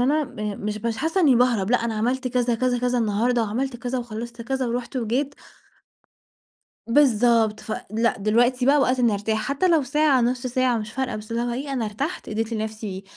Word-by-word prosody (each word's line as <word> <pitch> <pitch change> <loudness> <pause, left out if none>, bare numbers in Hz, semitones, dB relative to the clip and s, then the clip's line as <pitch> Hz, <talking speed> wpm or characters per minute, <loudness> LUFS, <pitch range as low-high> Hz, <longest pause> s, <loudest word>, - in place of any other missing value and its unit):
أنا 305 +1 +2 0.3
آآ - - -8
مش 215 +2 -3
حاسة 325 +7 0
إني 280 -8 +5
باهرَب، 235 -5 +2
لأ 245 - +5
أنا 225 -1 -2
عملت 255 +4 -1
كذا، 245 -1 +1
كذا، 245 +1 0
كذا 245 0 0
النهاردة، 230 +2 +1
وعملت 240 +4 -2
كذا 250 +1 -3
وخلصت 235 0 -6
كذا 265 +2 -2
ورُحت 245 +2 -3
وجيت. 255 +5 -1 1.5
بالضبط، 230 -4 +3
فلأ، 220 +1 -2
دلوقتي 240 +5 +2
بَقى 285 +2 +5
وقت 255 -1 +2
إني 235 -3 +3
أرتاح، 220 +2 -1
حتى 285 +7 +1
لو 325 -5 +3
ساعة، 285 -1 +2
نُص 250 +1 0
ساعة، 250 -1 +1
مش 215 -1 -5
فارقة، 265 -3 -2
بس 215 +1 -9
اللي 230 +1 -1
هو 240 - -2
إيه، 275 +3 -4
أنا 245 -4 -1
إرتحت، 270 - -4
إديت 225 +1 -2
لنَفْسي 215 -3 -4
240 Hz, 185 wpm, -23 LUFS, 220-260 Hz, 1.5 s, إني